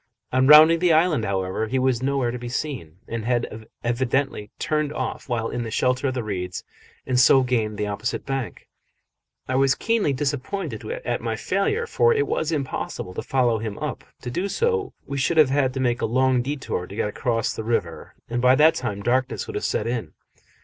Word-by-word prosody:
On 130 +1 +3
rounding 155 +3 +8
the 175 -1 +4
island, 155 -7 +3
however, 95 +2 -1
he 130 - -1
was 130 -2 +1
nowhere 135 -2 0
to 125 - -5
be 120 0 -6
seen, 120 - -4
and 115 -1 -4
had 115 -2 -2 0.2
evidently 120 -2 -1
turned 155 -4 -1
off 150 - -4
while 115 -2 -1
in 120 - -3
the 115 - -4
shelter 125 +4 +1
of 130 - -2
the 125 - -2
reeds 90 -4 -4 0.4
and 125 -1 +1
so 130 +1 +6
gained 115 -4 -1
the 105 - -1
opposite 105 +3 -3
bank. 135 -3 -4 0.8
I 130 - -2
was 135 0 +3
keenly 225 -9 +1
disappointed 145 +8 -3
at - - -3
my - - -2
failure, 445 +2 0
for 465 0 +3
it 430 -1 +2
was 160 - -1
impossible 135 - -3
to - - -4
follow 120 -4 +1
him 110 -2 -5
up: - - -4 0.2
to 125 - -4
do 180 +10 -1
so 460 - 0
we 140 0 -4
should 160 +5 +1
have 150 -4 +6
had 135 -2 +2
to - - -2
make 120 -2 0
a - - +1
long 130 +2 +2
detour 130 -9 -3
to 100 - -10
get 105 - 0
across 115 +1 -1
the 110 - -5
river, 115 +1 -3
and 120 +1 -2
by 125 +1 +6
that 155 +3 +6
time 105 -9 -4
darkness 130 +3 0
would - - -7
have - - -3
set - - -1
in. 115 -9 -3
130 Hz, 205 wpm, -23 LUFS, 115-145 Hz, 0.8 s, rounding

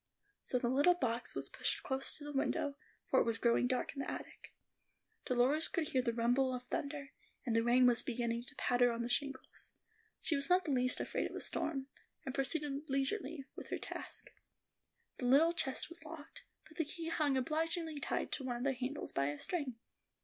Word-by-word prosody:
So 250 - +1
the 245 - 0
little 285 +8 +5
box 245 -7 -1
was - - -2
pushed - - -1
close 265 0 +1
to 295 - -6
the 295 - -5
window, 280 +1 +1 0.3
for - - +4
it - - +5
was 230 -1 0
growing 235 +1 +3
dark 255 0 0
in 280 - -7
the - - -3
attic. - - -7 0.7
Dolores 260 +6 +3
could 325 -4 -1
hear 260 - +2
the 240 -2 +1
rumble 245 +3 +2
of 250 - -6
thunder, 280 +2 -4 0.3
and 235 -3 +1
the 230 - +5
rain 245 +2 +5
was 245 -1 +6
beginning 235 -1 -1
to - - -11
patter 245 0 +3
on 235 0 -2
the 235 - -3
shingles; 275 +1 -3 0.5
she 320 - 0
was 280 +3 +2
not 360 +1 +5
the 300 - 0
least 255 -1 +3
afraid - - -1
of - - -9
a - - -3
storm, 270 -4 -1 0.4
and 265 - -3
proceeded 285 +1 0
leisurely 275 +2 -1
with - - -8
her - - -1
task. - - -7 0.9
The 245 - 0
little 310 +7 +6
chest 265 -6 0
was 340 0 -9
locked, 315 -1 -9 0.2
but 315 - -17
the 325 - +1
key 330 +2 -4
hung 295 -4 +2
obligingly 320 +3 -1
tied - - -1
to 275 - -3
one 250 -2 -2
of 240 - -3
the 275 0 +2
handles 260 +3 -2
by 140 0 +1
a 145 0 -2
string. 285 - -2
270 Hz, 205 wpm, -36 LUFS, 245-300 Hz, 0.9 s, was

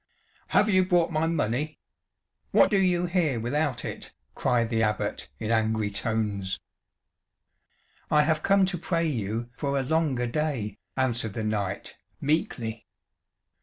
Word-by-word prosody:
"Have 210 - +4
you 185 -3 +4
brought 175 -3 +2
my 160 0 +1
money? 150 -1 -1 0.7
What - - +5
do 200 - +4
you 180 -2 +2
here 170 -8 +1
without 135 +3 -1
it?" - - -6 0.2
cried 115 -2 +1
the 110 -1 +2
Abbot 105 - -1
in 110 - -3
angry 110 -2 +1
tones. 100 -3 -1 1.5
"I 150 0 +5
have 155 0 +1
come 195 -1 +4
to 185 -2 -2
pray 170 -1 0
you 115 -4 -2
for 140 +2 -1
a 135 - +1
longer 145 -4 +1
day," 120 -6 -2 0.2
answered 120 -5 0
the 110 - -3
knight, 100 -3 -2 0.2
meekly. 120 -7 -1
130 Hz, 135 wpm, -27 LUFS, 110-160 Hz, 1.5 s, What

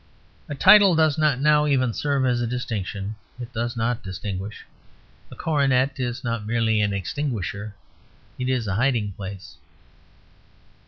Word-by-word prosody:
A 145 - -4
title 195 +3 +7
does 155 -2 +3
not 150 -5 +2
now 150 +1 +4
even 130 -4 +1
serve 140 0 0
as 120 -1 +1
a 120 - -1
distinction: 105 -4 -4 0.2
it 120 0 -8
does 120 +1 -3
not 115 +1 -1
distinguish. 95 +1 -6 0.6
A - - -11
coronet 140 -4 +1
is 120 -1 -3
not 115 -3 -2
merely 110 -2 +1
an 105 -1 +1
extinguisher: 100 - -4 0.6
it 125 0 -1
is 125 -3 0
a 100 - -2
hiding 115 -2 +1
place. 95 -1 -9
120 Hz, 145 wpm, -24 LUFS, 105-140 Hz, 0.6 s, title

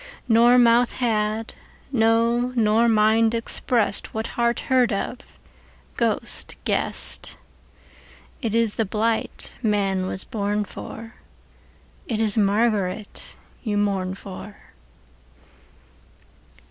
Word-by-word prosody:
Nor 240 +1 +6
mouth 240 0 +4
had, 220 -2 -1 0.4
no 235 +1 +2
nor 225 0 +3
mind, 220 +1 +3
expressedWhat 230 -1 -1
heart 235 0 0
heard 255 -3 +2
of, 240 +6 -5 0.6
ghost - - -1
guessed:It 225 -5 -5
ís 230 -2 +2
the 225 - +1
blight 220 +3 -2
man 195 -4 0
was 190 - -2
born 210 -2 -2
for, 225 +3 -9 0.9
It 220 -3 -2
is 215 -2 +1
Margaret 205 -1 0 0.3
you 210 -4 -2
mourn 195 -2 0
for. 200 +1 -10
220 Hz, 90 wpm, -23 LUFS, 205-235 Hz, 0.9 s, Nor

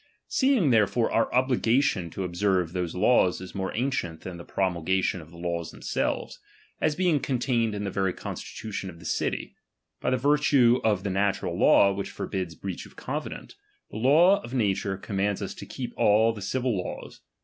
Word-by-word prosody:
10. - - -35 0.2
Seeing 260 - +3
therefore 115 +1 +2
our 115 - +1
obligation 125 - +2
to 95 - -5
observe 90 -1 0
;iie - - -16
those 90 -2 -3
laws 95 -2 +3
is 95 0 -9
more 95 -1 -3
ancient 110 - -2
than 90 -2 -7
the 85 - -9
promulgation 95 0 0
™°' - - -8
of 80 - -14
the 85 - -14
laws 85 -1 -3
themselves, - - -3 0.4
as 155 -1 +2
being 175 -4 +2
contained 120 -5 0
in 100 - -3
the 100 - -3
'"^' - - -15
very 95 -1 +1
constitution 100 +1 -6
of 85 - -11
the 85 - -14
city; - - -2 0.5
by - - -1
the 130 - +2
virtue 135 -3 +4
of 105 -4 +1
the 100 - -2
natural 100 +1 0
law 100 0 +5
which 100 0 -4
forbids 90 -4 -4
breach 95 +2 -6
of - - -20
covenant, - - -5 0.4
the - - -6
law 165 - +5
of 125 - -7
nature 100 -4 0
commands 100 0 -1
us - - -4
to - - -10
keep 125 -2 -6
all 110 +2 +4
the 105 - -9
civil 125 +3 -1
laws. 90 - -6
100 Hz, 195 wpm, -26 LUFS, 95-125 Hz, 0.5 s, law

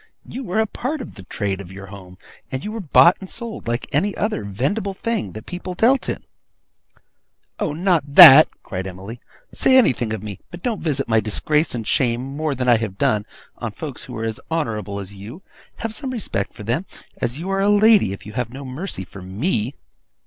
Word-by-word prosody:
You 265 - -7
were 190 -3 -3
a 220 - +3
part 260 +8 -4
of - - -8
the 100 - -11
trade 100 +1 -3
of 95 -2 -11
your 95 +1 -9
home, 95 -2 -12 0.3
and 130 +1 -4
were 215 +2 -4
bought 170 -1 +5
and 190 - -9
sold 230 - -7
like 120 +1 -1
any 195 +8 0
other 210 - -1
vendible 145 - -2
thing 225 - -2
your 110 - -7
people 180 0 -6
dealt 250 +7 +3
in.' - - -4 1.4
'Oh, - - -1
not 160 -4 0
that!' 140 +4 +12 0.2
cried 95 -2 -5
Emily. 95 +6 -8 0.3
'Say 260 - +4
anything 125 - +3
of 110 -2 -4
me; 105 -3 -7
but 175 0 -11
don't 230 -4 -2
visit 140 -5 -1
my 110 -1 +3
disgrace 150 +8 0
and 115 -2 -4
shame, 120 -1 +1
more 155 -1 -1
than 125 0 -2
I 120 -2 +6
have 105 -4 -4
done, 105 +1 +1 0.3
on - - -4
folks - - -7
who - - -8
are 110 - -4
as 110 -1 -3
honourable 110 -11 -2
as 100 0 -7
you! 110 - -10 0.3
Have 225 -1 -4
some 270 +2 -5
respect 215 - -3
for - - -10
them, 125 - -2 0.3
as 120 +3 -1
you 180 +5 -4
are 195 0 +1
a 200 - +3
lady, 205 - +5
if 100 - -8
you 105 - -9
have 125 -1 -2
no 135 +3 -9
mercy 130 - -5
for 95 - -12
me. 110 - -2
130 Hz, 205 wpm, -21 LUFS, -, 1.4 s, that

